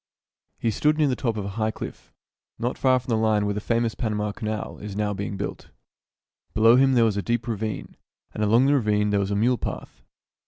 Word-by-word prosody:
He 115 - 0
stood 150 +8 +2
near 155 - +3
the 130 - +1
top 115 -3 -2
of 100 - -3
a 100 +2 -6
high 110 - +2
cliff, - - -8 0.5
not 120 +2 -2
far 130 -1 +3
from 125 +1 -7
the 115 - +3
line 110 -2 +2
where 105 - 0
the 105 - -3
famous 115 0 0
Panama 105 -3 -2
Canal 110 0 -5
is 105 -1 -7
now 105 0 0
being 100 0 -4
built. 100 - -5 0.9
Below 115 +2 +6
him 135 0 +4
there 120 -2 +5
was 105 -3 +1
a - - 0
deep 120 +3 -1
ravine, 110 -2 -4 0.4
and 105 - -2
along 115 +5 +4
the 140 - +4
ravine 105 -5 +2
there 100 - +2
was 100 -1 -1
a 100 - 0
mule 120 +3 +2
path. - - -6
110 Hz, 225 wpm, -25 LUFS, 105-120 Hz, 0.9 s, Below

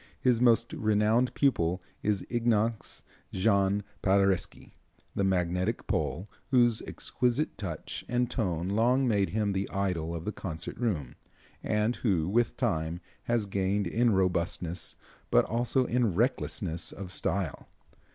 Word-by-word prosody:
His 125 -2 +2
most 120 -1 +4
renowned 110 +3 +2
pupil 90 - +2 0.2
is 105 -3 0
Ignace 115 -2 0 0.3
Jan 100 0 +2 0.2
Paderewski, 95 -2 +1 0.4
the 100 - 0
magnetic 90 +2 0
Pole, 75 +6 -1 0.2
whose 120 -4 +4
exquisite 125 +5 -1
touch 85 -6 -5
and 125 0 +1
tone 90 -8 -1
long 125 +6 +3
made 100 -4 +2
him 105 -1 0
the 95 0 -2
idol 90 -4 -1
of 85 0 -6
the 105 - -1
concert 80 -6 -6
room, 90 - -1 0.5
and 105 +3 0
who, 90 -9 +1
with 115 +4 +1
time, 85 -8 -1 0.3
has 120 -3 +1
gained 100 +1 0
in 115 +7 +2
robustness, 90 -2 0 0.3
but - - +4
also 120 +3 +1
in 120 -7 +1
recklessness 100 -6 0
of 95 -2 -8
style. 95 -4 -2
100 Hz, 130 wpm, -29 LUFS, 90-120 Hz, 0.5 s, most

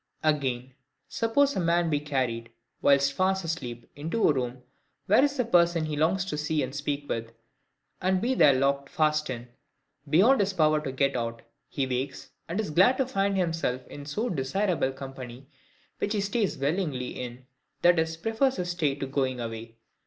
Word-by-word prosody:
Again: 130 -5 0 0.3
suppose 280 +5 +2
a - - 0
man 170 -1 +2
be 145 - +2
carried, 130 -6 -2 0.3
whilst 140 0 +4
fast 190 +2 +1
asleep, 120 -8 -5
into 165 +10 0
a - - +4
room 125 -1 -3 0.4
where 215 +7 +5
is 285 0 +1
a 250 - +1
person 170 -6 +3
he 155 -1 -3
longs 175 +6 +1
to 150 -6 -3
see 150 -1 0
and 130 0 -5
speak 145 0 -3
with; 115 0 -4 0.7
and 185 0 +2
be 240 +6 +1
there 145 - +6
locked 140 +1 +1
fast 155 -1 +1
in, 120 -1 -5 0.6
beyond 210 - +5
his 200 -1 +1
power 155 -3 +3
to 140 -3 -4
get 135 +1 +1
out: 115 -1 -3 0.3
he 140 - -2
awakes, 130 +1 -3 0.2
and 175 +5 -2
is 215 -8 -2
glad 190 +11 +5
to 265 - +2
find 200 -6 0
himself 165 -8 -1
in 145 0 -9
so 215 +11 -2
desirable 175 - 0
company, 135 -1 -9 0.5
which 205 - -1
he 210 - 0
stays 200 -4 0
willingly 140 -3 -1
in, 125 +1 -7 0.4
i. 175 - +7
e. 160 -2 +1
prefers 225 +7 +1
his 180 0 -2
stay 155 -6 0
to 135 - -4
going 130 -2 -1
away. 115 -1 -6
150 Hz, 180 wpm, -27 LUFS, 130-185 Hz, 0.7 s, i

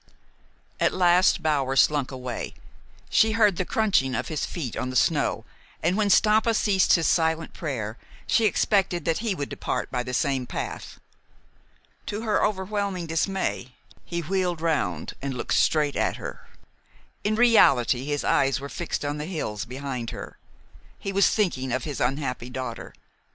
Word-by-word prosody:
At - - +2
last 180 0 +4
Bower 140 -4 +1
slunk 145 -1 +3
away. 125 -3 -5 0.6
She 220 0 +4
heard 210 -5 +3
the 185 - -1
crunching 190 - +1
of - - -3
his 155 -3 -2
feet 140 -10 -5
on 130 - -3
the 130 - -6
snow, - - +1 0.4
and, 175 +3 +2
when 210 -1 +1
Stampa 220 +3 +4
ceased 195 -3 +3
his 165 -2 +3
silent 160 0 +1
prayer, 120 - -4 0.3
she 225 - +2
expected 190 -6 +1
that 165 -1 +1
he 220 -3 -1
would 140 -4 -3
depart - - -3
by 125 - -1
the 125 0 -4
same 135 -3 0
path. - - -6 1.1
To 210 +1 -3
her 215 -2 +1
overwhelming 200 -2 -1
dismay, 165 -6 -2 0.3
he 170 -1 -4
wheeled 180 0 -1
round 100 - -1
and 135 -1 -3
looked 120 - -2
straight 150 -2 +2
at - - 0
her. - - -8 0.8
In 215 +1 +1
reality 140 - +4
his 145 0 -2
eyes 135 -1 +2
were 140 +1 -7
fixed - - -4
on 145 +1 -2
the 150 - -3
hills 125 - -4
behind 125 -2 -5
her. - - -8 0.6
He 195 - -4
was 200 +1 +4
thinking 135 - 0
of 130 0 -1
his 145 -3 -4
unhappy 125 -1 -2
daughter. 130 0 -6
155 Hz, 160 wpm, -25 LUFS, 130-190 Hz, 1.1 s, last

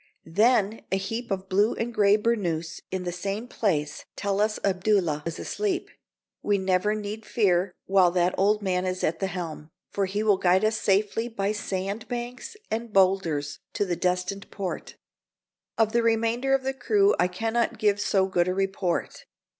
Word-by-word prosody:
Then 215 +4 +2
a 190 - +2
heap 225 +5 -4
of 190 -1 -3
blue 205 +4 +2
and 230 - -2
a - - -8
gray 205 -2 +4
burnoose 175 -8 -1
in 185 -1 -3
the 175 - -2
same 200 +6 -4
place 155 -12 -1
tell 200 0 -1
us 215 0 +1
Abdullah 185 -5 +1
is 165 - -4
asleep. 395 -4 -2 0.5
We 205 -1 +2
need 190 - -4
never 210 +3 0
fear 185 -5 +1
while 190 -2 +5
that 180 0 +1
old 205 +2 +2
man 185 -1 0
is 185 0 -3
at 160 +1 0
the 195 - 0
helm, 165 -4 -6 0.2
for 195 -1 0
he 205 +3 -2
will 210 -3 +4
guide 185 +3 +3
us 220 +1 +2
safely 210 +3 +1
by 205 -4 -1
sand 200 +1 -3
banks 245 - -5
and 230 +1 -3
bowlders 185 -7 +2
to 205 - 0
the 180 -2 -1
destined 180 +3 -1
port. 195 -3 -5 0.8
Of 220 -1 +3
the 235 0 +2
remainder 230 +4 +2
of 270 - -2
the 265 0 -1
crew 395 +10 +3
I 180 - +4
can 225 +5 -3
not 235 -1 +1
give 205 -1 +2
so 195 -1 +2
good 180 -2 +1
a 185 - 0
report. 195 -2 -2
200 Hz, 180 wpm, -26 LUFS, 185-220 Hz, 0.8 s, while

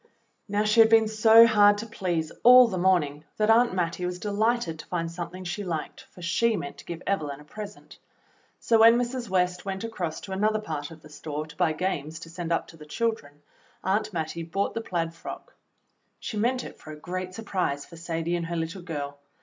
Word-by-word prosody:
Now, 205 0 0
she 215 +2 +2
had 225 0 +8
been 225 -1 +5
so 220 +1 +7
hard 205 -2 +5
to 215 - -5
please 175 -7 -2
all 250 +1 +9
the 220 - -4
morning 160 -6 +2
that 215 +1 +3
Aunt 235 -3 +4
Mattie 175 0 -1
was 180 0 -4
de 205 +3 -4
lighted 215 -6 0
to - - -9
find 165 -2 -2
something 175 +2 -6
she 185 +3 -4
liked, 165 -5 -5
for 180 - -13
she 220 +6 +2
meant 140 - -7
to - - -12
give 170 0 -7
Evelyn 150 -8 -2
a - - -13
present; 205 +6 -10 0.6
so 225 -1 +3
when 230 +1 +8
Mrs. 245 -1 -3
West 180 -1 0
went 195 0 -4
across 180 -8 -4
to 195 - -9
another 210 +3 +1
part 155 -8 -5
of 160 -1 -14
the 155 - -14
store 150 0 -5
to 150 -1 -14
buy 165 -1 +1
games 155 -2 -3
to 165 - -10
send 170 -1 -5
up 165 - +1
to 165 - -14
the 155 - -12
childreuj 220 -5 -2 0.5
Aunt 200 +3 0
Mattie 165 -1 -3
bought 170 +5 -2
the 230 - -3
plaid 165 -5 -2
frock. 165 - -9 0.7
She - - -6
meant 245 +4 0
it - - -10
for - - -13
a - - -7
great 185 +4 -5
surprise 180 -10 -2
for 170 - -14
Sadie 165 0 -2
and 170 -1 -3
her 170 - -3
little 165 +3 -4
girl. 145 -4 -5
180 Hz, 215 wpm, -26 LUFS, 165-215 Hz, 0.7 s, all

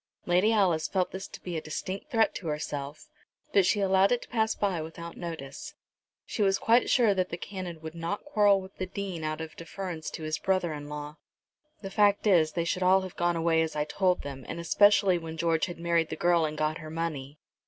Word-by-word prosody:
Lady 180 +5 +3
Alice 185 -8 +2
felt 185 -2 0
this 190 +1 -6
to - - -11
be 175 -2 -4
a 160 - -2
distinct 185 - -5
threat 225 -5 +2
to 175 - -6
herself, 150 -1 -4 0.5
but 195 -2 +5
she 210 - +2
allowed 195 0 +4
it 245 - +1
to - - -16
pass 220 -2 +1
by 190 -5 0
without 165 +1 -8
notice. 160 -6 -7 0.5
She - - -4
was 195 -1 +3
quite 235 +2 +3
sure 230 -5 +4
that 185 -1 -1
the 170 - -4
Canon 180 -3 -6
would 160 0 -7
not 170 - -4
quarrel 205 -8 +4
with 190 0 -11
the 185 - -3
Dean 190 -4 -5
out 155 0 -3
of 160 0 -7
deference 165 -1 -6
to 160 - -6
his 155 0 -2
brother 185 -4 0
in 145 -1 -7
law. 150 +1 -7 0.7
"The 195 - -5
fact 205 +1 +3
is 165 -7 +4
they 170 -1 -1
should 180 +2 -1
all 185 +1 +5
have 185 -1 -7
gone 175 0 +1
away 165 0 +2
as 160 -1 -2
I 150 - +1
told 180 +3 +1
them, 135 -2 -7
and 170 - -4
especially 195 +1 +4
when 165 -1 -7
George 165 0 +1
had 175 - -7
married 170 -1 +1
the - - -3
girl 175 -2 +3
and 155 0 -4
got 155 +1 -1
her 155 -1 -8
money. 155 -3 -4
170 Hz, 225 wpm, -28 LUFS, 160-195 Hz, 0.7 s, but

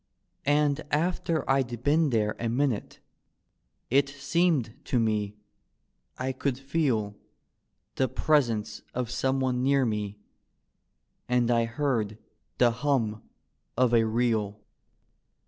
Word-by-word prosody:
And 145 0 +3
after 165 0 0
I'd 125 -3 0
been 150 +2 +3
there 105 -3 +1
a 115 - -1
minute 125 -2 -1 0.9
it 140 +1 +4
seemed 145 -3 +1
to 125 - +1
me 105 -2 0 0.8
I 130 +1 -1
could 130 0 -2
feel 135 -7 0 0.8
The 130 - +2
presence 115 -10 +1
of 125 -1 -2
someone 130 0 0
near 135 0 +3
me, 105 -2 -2 1.1
and 120 -1 +2
I 115 -1 +3
heard 115 -4 -1 0.4
the 120 -1 +5
hum 115 -4 0 0.6
of 125 -1 +3
a 115 -1 +5
reel. 110 -2 0
125 Hz, 110 wpm, -28 LUFS, 115-140 Hz, 1.1 s, the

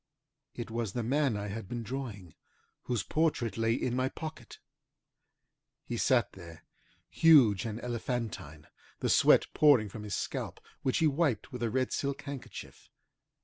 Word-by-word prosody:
It 115 -1 -6
was 115 -4 -2
the 120 - -2
man 135 -1 +1
I 105 0 -4
had 105 -1 -6
been 120 -1 -4
drawing, 110 - -6 0.5
whose 120 -6 -1
portrait 150 -8 0
lay 115 0 +1
in 125 -1 -1
my 130 +1 +1
pocket. 155 -7 -8 1.3
He 120 - -4
sat 120 0 +2
there, 85 -3 -12 0.4
huge 130 - +5
and 110 0 -4
elephantine, 115 - -4 0.3
the - - -1
sweat - - +6
pouring 135 -9 +5
from 105 - -8
his 105 -2 -4
scalp, - - -4 0.2
which 130 - +1
he 165 - +3
wiped 140 -7 0
with 125 -2 -7
a 120 - +1
red 130 +2 0
silk 140 0 -2
handkerchief. 140 -1 -9
120 Hz, 150 wpm, -31 LUFS, 105-135 Hz, 1.3 s, sweat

